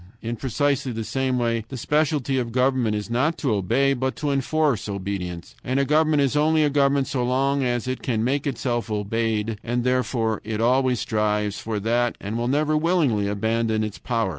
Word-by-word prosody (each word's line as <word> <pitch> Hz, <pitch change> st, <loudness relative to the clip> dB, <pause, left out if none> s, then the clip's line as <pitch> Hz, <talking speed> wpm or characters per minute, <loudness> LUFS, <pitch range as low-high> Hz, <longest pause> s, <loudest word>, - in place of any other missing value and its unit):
In 115 Hz, +1 st, -4 dB
precisely 135 Hz, +1 st, 0 dB
the 115 Hz, -1 st, -4 dB
same 130 Hz, +3 st, -1 dB
way 115 Hz, -2 st, 0 dB
the 130 Hz, -, -6 dB
specialty 145 Hz, -1 st, +1 dB
of 120 Hz, -2 st, -3 dB
government 125 Hz, -3 st, +1 dB
is 105 Hz, -1 st, -3 dB
not 145 Hz, +8 st, +1 dB
to 135 Hz, -7 st, 0 dB
obey, 130 Hz, +8 st, +2 dB
but 130 Hz, +1 st, -2 dB
to 145 Hz, -1 st, -2 dB
enforce 140 Hz, -4 st, 0 dB
obedience. 95 Hz, 0 st, -5 dB
And 130 Hz, +2 st, 0 dB
a 140 Hz, -, +2 dB
government 155 Hz, 0 st, +3 dB
is 140 Hz, +1 st, 0 dB
only 155 Hz, +1 st, +3 dB
a 145 Hz, -, +2 dB
government 140 Hz, -1 st, +3 dB
so 125 Hz, -2 st, -2 dB
long 135 Hz, +3 st, +1 dB
as 120 Hz, 0 st, -1 dB
it 130 Hz, 0 st, -3 dB
can 115 Hz, -4 st, -1 dB
make 140 Hz, +4 st, 0 dB
itself 120 Hz, -3 st, -2 dB
obeyed, 110 Hz, +1 st, -1 dB
and 120 Hz, +1 st, -1 dB
therefore 125 Hz, -3 st, 0 dB
it 110 Hz, 0 st, -3 dB
always 125 Hz, +1 st, +2 dB
strives 105 Hz, -1 st, 0 dB
for 110 Hz, -2 st, -3 dB
that 120 Hz, +2 st, +1 dB
and 100 Hz, +3 st, -5 dB
will 120 Hz, +1 st, -1 dB
never 150 Hz, +3 st, +1 dB
willingly 150 Hz, -, +2 dB
abandon 110 Hz, +2 st, 0 dB
its 105 Hz, -2 st, -5 dB
power. 115 Hz, -5 st, -1 dB
125 Hz, 190 wpm, -23 LUFS, 110-140 Hz, -, government